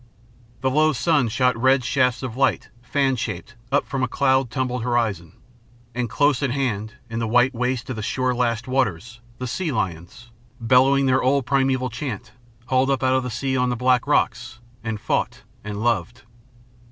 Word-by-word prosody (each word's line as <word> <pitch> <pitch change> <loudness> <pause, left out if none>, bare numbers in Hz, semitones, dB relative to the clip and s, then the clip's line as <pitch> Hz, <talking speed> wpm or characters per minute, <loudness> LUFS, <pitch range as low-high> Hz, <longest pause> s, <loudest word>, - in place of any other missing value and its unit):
The 130 -1 +1
low 155 +3 +3
sun 145 -2 +2
shot 125 +2 +2
red 130 +2 +3
shafts 125 +2 +1
of 120 -3 -4
light, 135 +1 +1
fan 135 +1 +1
shaped, 110 -2 -5 0.2
up 145 - +2
from 135 -1 -3
a 130 - +1
cloud 130 -1 +2
tumbled 125 +1 -2
horizon. 110 -9 -1 0.6
And 120 -1 -2
close 145 +2 +2
at 140 - +1
hand, 120 -5 -2
in 115 -1 -4
the 115 - -1
white 125 +4 +3
waste 125 0 -2
of 110 -4 -4
shore 130 +2 0
lashed 120 -1 -1
waters, 115 -3 -1 0.2
the 125 - -5
sea 160 +6 -2
lions, 95 +3 -4 0.3
bellowing 130 +4 +4
their 130 0 +3
old 135 0 +2
primeval 130 -2 +1
chant, 115 -4 -5 0.3
hauled 130 +1 +2
up 135 -1 0
out 130 0 +3
of 130 - +2
the 125 - -4
sea 130 +3 -2
on 125 -1 +1
the 125 - 0
black 125 +2 +2
rocks 120 -4 0 0.3
and 110 -2 -3
fought - - -2 0.2
and 105 +1 -5
loved. 115 -1 -1
125 Hz, 175 wpm, -23 LUFS, 115-130 Hz, 0.6 s, bellowing